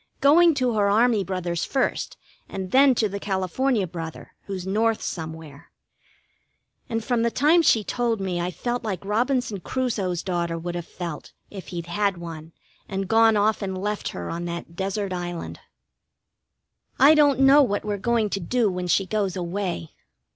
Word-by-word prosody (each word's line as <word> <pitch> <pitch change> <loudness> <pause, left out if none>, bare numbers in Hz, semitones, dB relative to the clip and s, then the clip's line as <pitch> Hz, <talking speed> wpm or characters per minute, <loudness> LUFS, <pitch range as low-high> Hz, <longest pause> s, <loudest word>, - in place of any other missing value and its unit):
Going 330 +3 +5
to 255 -3 +1
her 205 -2 +2
army 220 0 +3
brother's 180 -2 -3
first, 270 - -1 0.3
and 190 -1 -5
then 270 0 +6
to 220 - +2
the 200 0 -5
California 200 +4 0
brother, 165 -2 -8
who's 190 -2 -5
North 220 +3 +1
somewhere. 160 -3 -7 1.2
And 225 -1 -2
from 240 0 0
the 235 - +2
time 300 +8 +4
she 225 -9 +3
told 235 0 -1
me 185 -3 -2
I've 180 0 -3
felt 245 0 -3
like 195 -4 -4
Robinson 240 0 0
Crusoe's 195 -6 -2
daughter 170 -3 -2
would 175 +1 -5
have 175 -1 -5
felt, 170 -4 -7 0.2
if 195 -3 -9
he'd 170 -2 -5
had 200 +2 0
one, 165 -2 -8 0.4
and 195 -1 -3
gone 225 +1 +5
off 215 +1 +2
and 190 -2 -3
left 210 +2 -3
her 85 -1 -6
on 170 +1 -4
that 170 -1 -6
desert 195 +1 -2
island. 175 -1 -5 1.4
I 285 +3 +7
don't 290 -4 +4
know 270 +2 +7
what 205 -7 0
we're 205 -1 -2
going 225 0 0
to 195 - -1
do 215 +4 +1
when 180 0 -3
she 190 +3 +2
goes 200 -2 -1
away. 180 - -3
200 Hz, 170 wpm, -24 LUFS, 175-235 Hz, 1.4 s, I